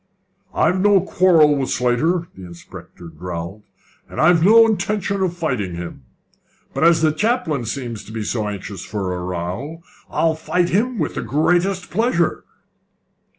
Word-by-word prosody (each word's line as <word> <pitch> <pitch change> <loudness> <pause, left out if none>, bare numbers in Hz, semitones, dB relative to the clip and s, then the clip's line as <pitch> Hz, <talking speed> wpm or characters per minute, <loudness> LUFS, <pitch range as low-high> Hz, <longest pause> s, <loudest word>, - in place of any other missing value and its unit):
"I've 185 +1 +2
no 205 0 +5
quarrel 170 -5 +4
with 135 -2 -2
Slater," 160 +8 0
the 95 - -11
inspector 85 0 -12
growled, 85 +4 -7 0.5
"and - - -8
I've 165 +1 +4
no 225 +4 +7
intention 200 -2 -1
of 175 -2 -1
fighting 125 - -2
him; 85 -6 -8 0.7
but - - -1
as 165 -1 +4
the 155 - +4
chaplain 165 - -1
seems 115 -2 -5
to - - -11
be 110 -1 -4
so 110 0 -2
anxious 100 -2 -6
for 95 -3 -3
a 90 0 -5
row, 90 - -5 0.3
I'll 165 -1 +1
fight 175 +2 -1
him 230 +6 0
with - - -2
the - - -3
greatest 175 - 0
pleasure." 190 -4 0
155 Hz, 150 wpm, -20 LUFS, -, 0.7 s, no